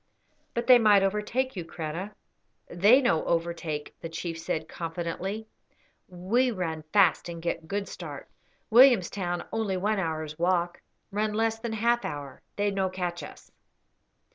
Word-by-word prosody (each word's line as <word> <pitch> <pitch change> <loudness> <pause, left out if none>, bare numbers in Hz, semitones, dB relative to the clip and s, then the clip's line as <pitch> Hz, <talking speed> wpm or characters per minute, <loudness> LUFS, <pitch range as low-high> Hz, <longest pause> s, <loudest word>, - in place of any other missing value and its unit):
"But 235 - -1
they 250 -2 +8
might 205 -3 +5
overtake 210 +6 -1
you, 180 - -4
Kreta." 165 +5 -6 0.5
"They 205 +10 +5
no 165 -10 +2
overtake," 165 -3 -2
the 165 - -5
chief 165 0 -5
said, 160 -1 -3
confidently. 175 +5 -4 0.6
"We 195 +9 +1
run 175 -7 -3
fast 185 -4 +4
and 170 -1 -6
get 165 -1 -3
good 200 +2 -2
start. - - -8 0.4
Williamstown 200 -8 +4
only 215 -4 -1
one 205 +2 0
hour's 155 -3 -3
walk; 175 0 +1 0.3
run 210 +1 -1
less 225 +1 0
than 230 -1 -4
half 235 +2 +1
hour. 145 -2 -6
They 205 0 +1
no 190 -1 0
catch 180 -2 -3
us." - - -12
185 Hz, 140 wpm, -27 LUFS, 170-215 Hz, 0.6 s, they